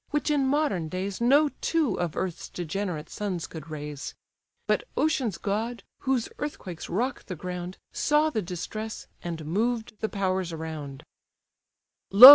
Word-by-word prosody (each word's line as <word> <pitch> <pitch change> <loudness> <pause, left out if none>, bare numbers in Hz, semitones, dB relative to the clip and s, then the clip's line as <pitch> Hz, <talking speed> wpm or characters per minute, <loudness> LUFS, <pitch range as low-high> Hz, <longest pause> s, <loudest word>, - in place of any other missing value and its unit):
which 295 +1 +1
in 280 -3 +3
modern 265 - +2
days 190 +4 -2
No 285 +5 +6
two 315 - +3
of 175 -3 0
earth's 185 -3 -2
degenerate 175 -2 -2
sons 185 -5 -2
could 160 -1 -8
raise. 150 -2 -5 0.5
But - - +3
ocean's 255 - +2
god, 220 +6 -1 0.2
whose 260 -4 +1
earthquakes 190 - -4
rock 245 +9 0
the 185 - -4
ground 180 +2 -4
Saw 300 +1 +3
the 220 - +1
distress, 210 +5 -4 0.2
and 165 -3 -4
moved 220 +8 +1
the 220 - 0
powers 190 -3 0
around: 155 -4 -5 1.1
"Lo! 230 +7 +14
195 Hz, 140 wpm, -28 LUFS, 170-245 Hz, 1.1 s, Lo